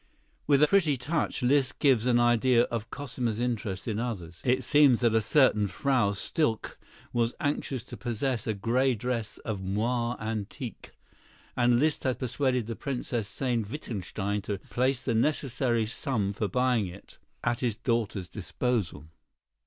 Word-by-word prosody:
With 140 Hz, 0 st, +5 dB
a -, -, +7 dB
pretty 160 Hz, -6 st, +3 dB
touch 145 Hz, +1 st, -1 dB
Liszt 135 Hz, +2 st, +2 dB
gives 125 Hz, -5 st, +3 dB
an 120 Hz, -1 st, +4 dB
idea 120 Hz, 0 st, +4 dB
of 115 Hz, -2 st, -3 dB
Cosima's 120 Hz, -5 st, -3 dB
interest 110 Hz, -5 st, -2 dB
in 110 Hz, -2 st, -1 dB
others. 90 Hz, -9 st, -5 dB
It 130 Hz, +1 st, +2 dB
seems 140 Hz, -2 st, +5 dB
that 120 Hz, -2 st, +3 dB
a 110 Hz, -, +4 dB
certain 110 Hz, -3 st, +4 dB
Frau 125 Hz, -3 st, +1 dB
Stilke 115 Hz, -, -1 dB, 0.4 s
was 120 Hz, 0 st, +1 dB
anxious 145 Hz, -5 st, -2 dB
to -, -, -10 dB
possess 120 Hz, 0 st, -2 dB
a 110 Hz, -, 0 dB
gray 125 Hz, +5 st, +1 dB
dress 115 Hz, -1 st, -3 dB
of 110 Hz, -3 st, -2 dB
moiré 115 Hz, +5 st, -1 dB
antique, 110 Hz, +2 st, -5 dB, 0.7 s
and 120 Hz, -1 st, +4 dB
Liszt 150 Hz, +4 st, +1 dB
had 130 Hz, -3 st, 0 dB
persuaded 125 Hz, -1 st, 0 dB
the 115 Hz, +1 st, -5 dB
Princess 120 Hz, -6 st, -3 dB
Sayn 120 Hz, 0 st, -1 dB
Wittgenstein 105 Hz, -, -3 dB
to 100 Hz, 0 st, -3 dB
place 130 Hz, +1 st, +1 dB
the 120 Hz, -, +1 dB
necessary 120 Hz, -2 st, +1 dB
sum 110 Hz, -4 st, -1 dB
for 105 Hz, +1 st, -1 dB
buying 125 Hz, 0 st, +1 dB
it 90 Hz, +3 st, -12 dB, 0.2 s
at 120 Hz, 0 st, 0 dB
his 120 Hz, -4 st, 0 dB
daughter's 115 Hz, -5 st, -1 dB
disposal. 105 Hz, -, -2 dB
120 Hz, 155 wpm, -28 LUFS, 110-130 Hz, 0.7 s, a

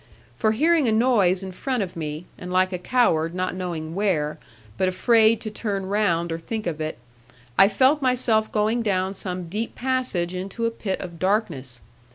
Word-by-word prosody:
For 215 Hz, -, +1 dB
hearing 310 Hz, +3 st, +3 dB
a -, -, +3 dB
noise 215 Hz, -5 st, +3 dB
in 190 Hz, -, -6 dB
front 250 Hz, +4 st, -2 dB
of 180 Hz, -, -7 dB
me, 155 Hz, 0 st, -5 dB
and 180 Hz, 0 st, -8 dB
like 185 Hz, +1 st, +2 dB
a 180 Hz, -, -2 dB
coward 170 Hz, -7 st, +1 dB
not 185 Hz, 0 st, -1 dB
knowing 170 Hz, -4 st, -4 dB
where, 170 Hz, -7 st, 0 dB, 0.4 s
but 185 Hz, -, +1 dB
afraid 225 Hz, +3 st, +4 dB
to 215 Hz, -, -5 dB
turn 200 Hz, -3 st, -3 dB
round 185 Hz, -4 st, +1 dB
or 165 Hz, -, -3 dB
think 220 Hz, +6 st, -5 dB
of 160 Hz, -3 st, -3 dB
it, 155 Hz, 0 st, -3 dB, 0.6 s
I 195 Hz, -, +7 dB
felt 260 Hz, +9 st, +3 dB
myself 245 Hz, -4 st, +2 dB
going 215 Hz, +3 st, +1 dB
down 190 Hz, -3 st, 0 dB
some 180 Hz, -2 st, -4 dB
deep 215 Hz, +6 st, -4 dB
passage 250 Hz, -9 st, -1 dB
into 195 Hz, +5 st, -4 dB
a 230 Hz, -, +1 dB
pit 205 Hz, -4 st, -3 dB
of 170 Hz, -3 st, -8 dB
darkness. 165 Hz, -, -1 dB
195 Hz, 185 wpm, -24 LUFS, 175-225 Hz, 0.6 s, I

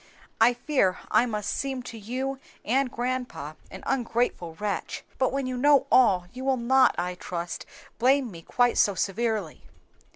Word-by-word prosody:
I 235 Hz, +2 st, +5 dB
fear 245 Hz, -8 st, +1 dB
I 245 Hz, -, +4 dB
must 210 Hz, -3 st, -2 dB
seem 265 Hz, -2 st, -3 dB
to 240 Hz, -, -8 dB
you 255 Hz, +5 st, -4 dB, 0.3 s
and 260 Hz, +3 st, +2 dB
grandpa 245 Hz, -, -3 dB, 0.2 s
an 190 Hz, -, -10 dB
ungrateful 230 Hz, -9 st, -1 dB
wretch; 205 Hz, +3 st, -3 dB, 0.2 s
but 260 Hz, -, +2 dB
when 275 Hz, 0 st, -1 dB
you 255 Hz, 0 st, -3 dB
know 285 Hz, +2 st, +5 dB
all, 195 Hz, -8 st, +5 dB
you 255 Hz, +1 st, -7 dB
will 265 Hz, -1 st, +2 dB
not, 255 Hz, +2 st, +4 dB
I 180 Hz, +1 st, -1 dB
trust, 175 Hz, -1 st, -5 dB, 0.3 s
blame 260 Hz, 0 st, +3 dB
me 165 Hz, -2 st, -10 dB
quite 245 Hz, +7 st, +1 dB
so 200 Hz, -, +4 dB
severely." 210 Hz, -3 st, -2 dB
240 Hz, 160 wpm, -26 LUFS, 200-260 Hz, 0.3 s, I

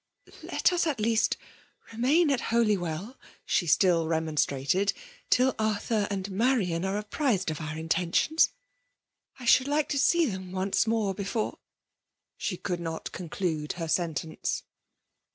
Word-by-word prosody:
"Let -, -, +1 dB
us 345 Hz, -1 st, +1 dB
at 285 Hz, -7 st, -1 dB
least 225 Hz, +1 st, +2 dB, 0.5 s
remain 285 Hz, +8 st, +3 dB
at 270 Hz, -, +2 dB
Holywell/' 210 Hz, -2 st, 0 dB, 0.3 s
she 175 Hz, -, +1 dB
still 170 Hz, 0 st, +3 dB
remonstrated, 160 Hz, +2 st, +1 dB, 0.2 s
" -, -, -26 dB
till 255 Hz, 0 st, +4 dB
Arthur 215 Hz, 0 st, 0 dB
and 195 Hz, -1 st, -3 dB
Marian 195 Hz, -6 st, +1 dB
are 190 Hz, +1 st, -1 dB
apprized 210 Hz, -, 0 dB
of 155 Hz, -, -5 dB
our 155 Hz, 0 st, -5 dB
intentions. 170 Hz, -, +2 dB, 0.9 s
I 250 Hz, -, -9 dB
should 255 Hz, +2 st, +5 dB
like 295 Hz, +1 st, +1 dB
to 280 Hz, -, 0 dB
see 340 Hz, +4 st, +4 dB
them 190 Hz, -6 st, -5 dB
once 190 Hz, +4 st, +1 dB
more 220 Hz, -3 st, +1 dB
before 205 Hz, +3 st, -3 dB, 0.4 s
" -, -, -60 dB, 0.3 s
She 180 Hz, -, -3 dB
could 180 Hz, -1 st, -3 dB
not 165 Hz, -1 st, -5 dB
conclude 165 Hz, -3 st, -3 dB
her 165 Hz, -2 st, -4 dB
sentence 160 Hz, -1 st, -2 dB
195 Hz, 140 wpm, -28 LUFS, 170-235 Hz, 0.9 s, should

